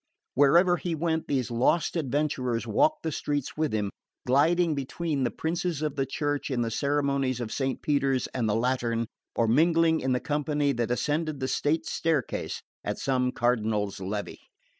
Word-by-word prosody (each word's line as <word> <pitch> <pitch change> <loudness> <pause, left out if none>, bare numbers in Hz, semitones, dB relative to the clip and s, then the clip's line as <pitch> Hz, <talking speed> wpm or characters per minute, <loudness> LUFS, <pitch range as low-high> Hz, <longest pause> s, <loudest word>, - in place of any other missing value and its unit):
Wherever 170 +6 +5
he 170 -1 -2
went 160 0 -1
these 130 -4 -1
"lost 125 +10 +2
adventurers" 135 -5 -1
walked 305 +2 +2
the 160 - -1
streets 145 -2 -2
with 155 -1 0
him, 105 -2 -1 0.3
gliding 160 +6 +3
between 145 +1 -2
the 120 - +2
Princes 165 0 -2
of 150 -2 -1
the 135 -1 -1
Church 145 +1 -2
in 125 -3 0
the 115 - -2
ceremonies 140 -1 0
of 115 -3 -4
Saint 135 -2 -2
Peter's 135 -3 +1
and 120 -4 0
the 105 - +2
Lateran, 115 -1 0 0.3
or 115 - +2
mingling 165 +5 +4
in 130 - -1
the 125 - +2
company 145 0 0
that 120 -3 -1
ascended 150 +4 -1
the 130 - -1
state 155 +4 0
staircase 160 -6 -1 0.2
at - - -3
some 125 -2 0
cardinal's 110 -5 0
levee. 100 +2 -4
140 Hz, 165 wpm, -27 LUFS, 125-155 Hz, 0.3 s, Wherever